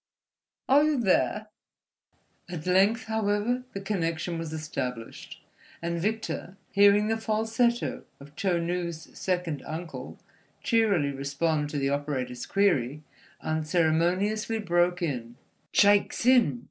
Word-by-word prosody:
Are 280 +3 +6
you 305 -3 +2
theah?" 210 0 +1 1.0
At 170 -3 -6
length, 195 +6 +3
however, 220 +3 0
the 195 - -5
connection 170 -4 -2
was 165 -2 -5
established; 130 -7 -6 0.4
and 170 0 -3
Victor, 215 -2 -3
hearing 205 +1 +5
the 225 0 +1
falsetto 225 +3 0
of 145 +1 -14
Chou 180 -2 0
Nu's 170 -1 -3
second 180 -5 -2
uncle 165 +2 -7 0.5
cheerily 205 - +2
respond 145 +2 -1
to 150 - -4
the 135 -1 0
operator's 140 -4 -3
query, 150 -8 +1 0.4
unceremoniously 175 +7 +1
broke 175 -3 +1
in: 120 -7 -3 0.4
"Shaik 205 0 +4
Tsin? 240 - +3
175 Hz, 110 wpm, -27 LUFS, 155-215 Hz, 1.0 s, Are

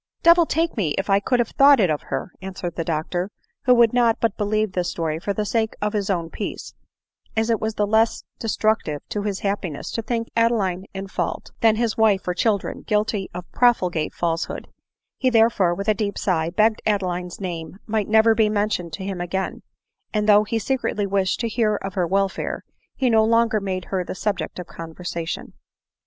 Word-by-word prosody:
<c - - -64
Devil 335 0 +6
take 330 +1 0
me 170 -10 0
if 195 +1 -1
I 195 - +5
could 245 +5 +1
have 240 -2 +1
thought 280 -1 +6
it 185 -6 +3
of 150 - -1
her 135 +6 -3
!" - - -41
answered 185 -2 -5
the 165 - -2
doctor 170 +3 -2 0.2
— - - -50
who 250 -1 +6
could 235 -1 +5
not 235 -2 +3
but 225 -3 +1
believe 215 0 0
this 180 -1 -1
story 160 -2 -2
for 200 - -2
the 210 +1 -1
sake 220 +1 0
of 210 +1 -1
his 205 -2 -1
own 170 -4 -1
peace, 205 - -5 0.6
as 225 +1 +2
it 225 - +1
was 220 0 -2
less 220 +2 +2 0.2
destruc 220 -1 +2
tive 150 -2 -5
to 210 - -2
his 205 -2 -3
happiness 195 -7 -3
to 230 - -2
think 230 0 -2
Adeline 210 -6 +1
in 195 0 -4
fault, - - -3
than 225 -1 +4
his 230 -1 0
wife 210 -4 +3
or 180 - +1
children 205 +1 0
guilty 210 -2 0
of 180 0 -5
profligate 180 -10 +2
falsehood; 165 -1 -2 0.5
he 255 - +3
therefore, 225 -7 +3
with 200 +3 -5
a 215 - +5
deep 205 -1 -2
sigh, 165 -4 0
begged 215 +4 +2
Adeline's 180 -4 -1
name 175 -2 -5
might 215 -2 -1
never 220 +1 +5
be 220 -1 +3
mentioned 205 -5 -1
to 170 - -5
him 190 -2 -4
again; 190 +2 -3 0.5
and 210 0 +1
though 210 0 +7
he 225 +2 -2
se 265 +5 0
cretly 210 -3 -1
wished 195 -1 0
to 230 - 0
hear 220 -2 +1
of 195 -1 -5
her 180 -2 0
welfare, 195 +2 -1 0.3
he 265 - +1
no 220 -2 +5
longer 225 -1 +3
made 185 -2 -3
her 190 -2 -2
the 180 - -6
subject 190 -5 -2
of 180 - -5
conversation. 165 0 -6
205 Hz, 205 wpm, -23 LUFS, 180-220 Hz, 0.6 s, though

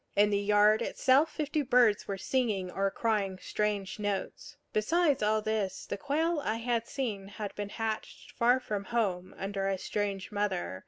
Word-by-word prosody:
In 205 +1 +4
the 200 - +2
yard 210 +2 +4
itself 270 +6 +3
fifty 305 0 -1
birds 245 -6 +3
were 195 - -3
singing 205 -6 -1
or 195 +1 0
crying 200 -3 -1
strange 205 0 -2
notes. 205 -2 -4 0.2
Besides 300 +6 +2
all 215 0 +2
this, 210 -3 -2
the - - -3
quail 310 +7 0
I 215 - 0
had 230 0 -1
seen 215 -8 -3
had 205 0 -6
been 205 -1 -5
hatched 220 0 -4
far 245 +1 +3
from 205 -5 -4
home, 195 -7 -1
under 195 0 -2
a 195 -1 0
strange 200 0 -3
mother. 195 - -2
210 Hz, 165 wpm, -30 LUFS, 200-240 Hz, 0.2 s, In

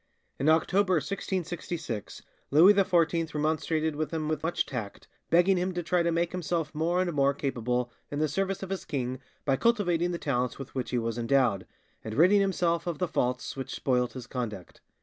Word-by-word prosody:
In 140 - +2
October 185 +4 +3
1666 170 - -3 0.3
Louis 170 +8 +7
XIV 170 -4 +2
remonstrated 155 +1 0
with 155 +1 -2
him 160 -2 -3
with 155 -1 -1
much 165 +2 0
tact, 115 -7 -6 0.2
begging 180 +3 +4
him 180 +1 -1
to 175 - -2
try 175 +1 +2
to 170 0 +1
make 170 +1 0
himself 170 -3 -2
more 165 +3 0
and 175 -2 -1
more 140 -1 +2
capable 125 -3 -1 0.2
in 145 - -4
the 155 +1 +2
service 195 +5 -2
of 190 - -6
his 195 - -3
king 130 -4 -3 0.3
by 135 -2 +2
cultivating 180 - +2
the 175 - -2
talents 125 -5 -1
with 135 -2 -9
which 130 -2 -3
he 125 - 0
was 115 0 -2
endowed, 120 -5 +2 0.4
and 110 0 -5
ridding 185 +7 +5
himself 175 -3 0
of 170 -3 -2
the 180 - 0
faults 125 -4 -1
which 135 -1 -5
spoilt 125 -2 0
his 130 -2 -7
conduct. 115 -7 -6
155 Hz, 190 wpm, -28 LUFS, 130-175 Hz, 0.4 s, Louis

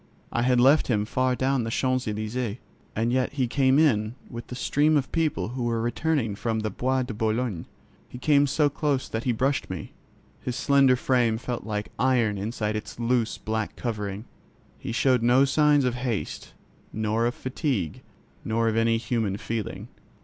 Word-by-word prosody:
I 120 - 0
had 125 0 +3
left 140 +5 +5
him 105 -4 +1
far 130 +3 0
down 130 -1 +1
the 115 - -3
Champs 130 +1 0
Elysķes, 110 +1 -3 0.4
and 115 +2 0
yet 130 +1 0
he 135 -3 +1
came 130 +2 +3
in 115 -7 +2 0.2
with 120 +1 -8
a - - -4
stream 150 +4 +2
of 135 - -2
people 160 -8 0
who 125 +2 -5
were 115 -1 0
returning 120 0 0
from 110 +2 -2
the 110 -1 -2
Bois 130 +5 0
de 125 -2 -5
Boulogne. 110 -4 -1 0.4
He - - -9
came 145 +2 +3
so 145 +2 +2
close 145 -2 -1
that 110 +1 -4
he 125 - +2
brushed 130 +4 0
me. 90 -4 -6 0.5
His 125 - -3
slender 135 -2 +4
frame 120 -3 +1
felt 120 0 -5
like 105 -1 -3
iron 120 -6 +2
inside 105 +1 -2
its 110 - -6
loose 120 -1 0
black 110 0 -3
covering. 105 -3 -4 0.5
He - - -5
showed 125 +1 +2
no 125 +4 +5
signs 145 0 +3
of 125 - +1
haste, 125 -4 -4 0.4
nor 110 +2 0
of 120 - -3
fatigue, 130 - -2 0.4
nor 115 +1 0
of 110 - +1
any 115 0 +3
human 115 -4 -1
feeling. 110 -2 -4
120 Hz, 180 wpm, -26 LUFS, 110-130 Hz, 0.5 s, left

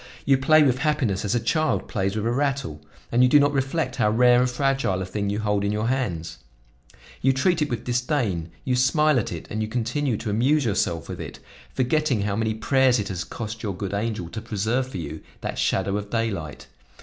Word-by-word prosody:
You 135 -1 +4
play 155 +3 +5
with 130 -3 +2
happiness 135 -10 0
as 105 - 0
a - - +2
child 155 +6 0
plays 95 +1 -1
with 110 0 -2
a 115 - +1
rattle, 135 - -1 0.3
and 120 - +3
you 125 - +6
do 145 - +7
not 145 0 +3
reflect 135 +4 -1
how 105 - +3
rare 120 +2 +5
and 125 - +2
fragile 135 -6 0
a 95 - -3
thing 100 +1 -3
you 100 - -1
hold 105 -2 0
in 100 - 0
your 105 +2 -1
hands; 90 - -2 0.8
you 135 - +4
treat 160 +5 +1
it 150 - +1
with 120 -2 -3
disdain, 120 - -1 0.2
you 130 - +1
smile 145 +2 +3
at 110 - -3
it 85 -3 -6
and 110 - -2
you 110 - -1
continue 120 +2 -1
to 110 -1 -4
amuse 130 +7 +2
yourself 85 -6 -1
with - - -6
it, - - -8 0.4
forgetting 135 -2 +1
how 100 -1 -1
many 110 0 -1
prayers 130 +2 +3
it 105 -3 -3
has 90 -2 -3
cost 110 +3 -6
your 100 -5 -4
good 100 0 -4
angel 105 -3 -2
to 110 - -6
preserve 115 +6 -1
for 130 - -6
you 80 -2 -6 0.2
that - - -4
shadow 95 +1 +1
of 100 -1 -6
daylight! 105 -10 -3
115 Hz, 220 wpm, -24 LUFS, 100-135 Hz, 0.8 s, do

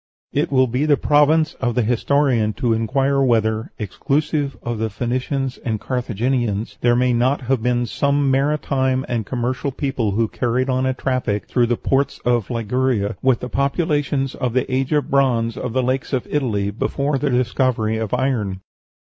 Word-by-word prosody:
It - - 0
will 130 -1 +4
be 130 +5 -1
the 145 -2 +4
province 150 +2 +3
of 120 -2 0
the 125 - +2
historian 120 -1 +1
to 120 -2 0
inquire 135 +5 +1
whether, 110 -3 +1
exclusive 140 - -1
of 110 -2 -2
Phoenicians 130 +4 -2
and 110 -3 -2
Carthaginians, 120 -3 -2
there 120 0 +3
may 125 0 +2
not 125 +4 +1
have 130 -1 0
been 120 0 +1
some 140 +3 +1
maritime 135 -2 +1
and 115 -4 -2
commercial 130 +2 -2
people 130 -5 -1
who 115 +2 +1
carried 125 +4 -1
on 130 +1 +1
a 130 - 0
traffic 125 -6 -1
through 120 -2 +2
the 120 0 0
ports 140 +1 0
of 120 -4 +1
Liguria 115 -2 0
with 130 -3 +2
the 125 - -4
populations 140 -1 0
of 125 -3 -2
the 130 - +1
age 130 +2 0
of 150 -1 0
bronze 120 -4 +2
of 125 - -4
the 130 +2 0
lakes 130 +3 -1
of 130 - 0
Italy 105 -9 0
before 140 +6 -1
the 145 - 0
discovery 125 -3 +1
of 110 -2 -3
iron. 105 -8 -1
125 Hz, 170 wpm, -20 LUFS, 115-135 Hz, -, will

